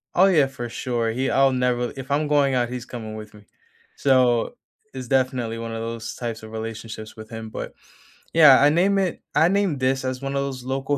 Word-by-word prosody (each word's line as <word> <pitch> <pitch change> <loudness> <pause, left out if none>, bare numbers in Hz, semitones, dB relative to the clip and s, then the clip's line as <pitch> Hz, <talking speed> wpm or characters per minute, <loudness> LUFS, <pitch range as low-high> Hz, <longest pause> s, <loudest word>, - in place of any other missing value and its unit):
Oh, 185 - +6
yeah, 160 -8 +4
for 125 -3 -6
sure; 120 -1 -2
he 130 +4 -1
I'll 135 0 +4
never 125 -1 0
if 135 0 -8
I'm 145 +2 +1
going 140 -2 +2
out, 120 -1 +1
he's 125 0 -6
coming 110 -3 -7
with 105 -1 -9
me. 105 -1 -15 0.5
So, 130 - +2 0.4
it's 130 -2 -7
definitely 125 -3 0
one 115 0 -5
of 115 0 -4
those 115 0 -5
types 115 -2 -5
of 110 0 -11
relationships 110 0 -7
with 110 0 -11
him, 110 -1 -7
but, - - -6 0.6
yeah, 150 -5 +8
I 145 - +6
name 185 +6 +2
it 185 -2 -1
I 160 - +5
named 190 -6 +1
this 130 +1 0
as 130 0 -3
one 135 0 -3
of 140 - +1
those 135 -2 -4
local 135 +2 -1
130 Hz, 215 wpm, -23 LUFS, 115-140 Hz, 0.6 s, yeah